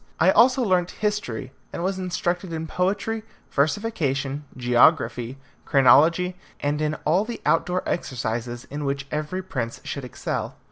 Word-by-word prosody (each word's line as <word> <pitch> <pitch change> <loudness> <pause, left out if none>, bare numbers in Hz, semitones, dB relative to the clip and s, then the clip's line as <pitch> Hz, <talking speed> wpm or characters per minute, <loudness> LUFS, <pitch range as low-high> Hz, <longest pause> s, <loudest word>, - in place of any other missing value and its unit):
I 180 +4 +6
also 255 +5 +5
learnt 180 -4 +2 0.2
history, 135 - -2 0.2
and 170 - -4
was 190 +1 -1
instructed 180 0 -2
in 160 0 -3
poetry, 200 +6 -1 0.3
versification, 145 -4 0
geography, 125 0 +3 0.3
chronology, 165 +7 +5 0.2
and 145 +1 -1
in 155 0 0
all 175 +6 +3
the 235 +1 -6
outdoor 180 +2 +1
exercises 120 -4 -3
in 145 +1 -4
which 140 -1 -2
every 155 +5 -2
prince 120 -10 -4
should 140 - -5
excel. 125 - -4
155 Hz, 135 wpm, -24 LUFS, 135-185 Hz, 0.3 s, I